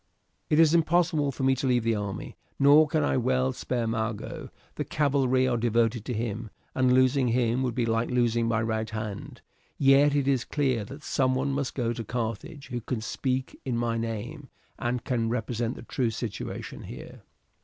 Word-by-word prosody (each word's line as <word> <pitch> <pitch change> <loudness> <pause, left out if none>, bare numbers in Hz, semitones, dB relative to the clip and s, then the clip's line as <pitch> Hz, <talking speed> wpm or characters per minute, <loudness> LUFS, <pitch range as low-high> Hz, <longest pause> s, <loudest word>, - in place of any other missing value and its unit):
It 150 - +3
is 160 -1 +6
impossible 165 -3 +2
for 135 - -5
me 135 0 +4
to 135 +1 -1
leave 125 -2 +2
the 115 0 +2
army, 100 -2 -4 0.2
nor 145 +3 +6
can 155 0 +1
I 140 - +1
well 130 +1 +1
spare 125 -1 -2
Mago. 110 -1 -3 0.2
The - - -3
cavalry 135 -3 +2
are 125 -2 +1
devoted 115 -1 +1
to 125 - -3
him, 110 0 -3 0.2
and 130 -1 +3
losing 130 +1 +4
him 120 +1 +1
would 125 -3 -1
be 120 -2 +1
like 115 +1 0
losing 120 -2 +1
my 115 0 +1
right 110 -1 -1
hand; 110 -2 -6 0.4
yet 140 +1 +5
it 140 -2 +1
is 135 -3 +2
clear 130 -7 0
that 140 +7 -10
someone 130 -1 +1
must 135 -1 -2
go 120 -3 0
to 115 - -5
Carthage 125 +6 -4
who 120 -2 -3
can 120 +1 -3
speak 130 +3 -3
in 125 -3 -2
my 115 -1 0
name, 115 +6 -4 0.3
and 120 0 -1
can 115 -3 0
represent 115 0 -2
the - - -10
true 120 0 -1
situation 110 -2 -5
here. - - -10
125 Hz, 185 wpm, -27 LUFS, 115-135 Hz, 0.4 s, is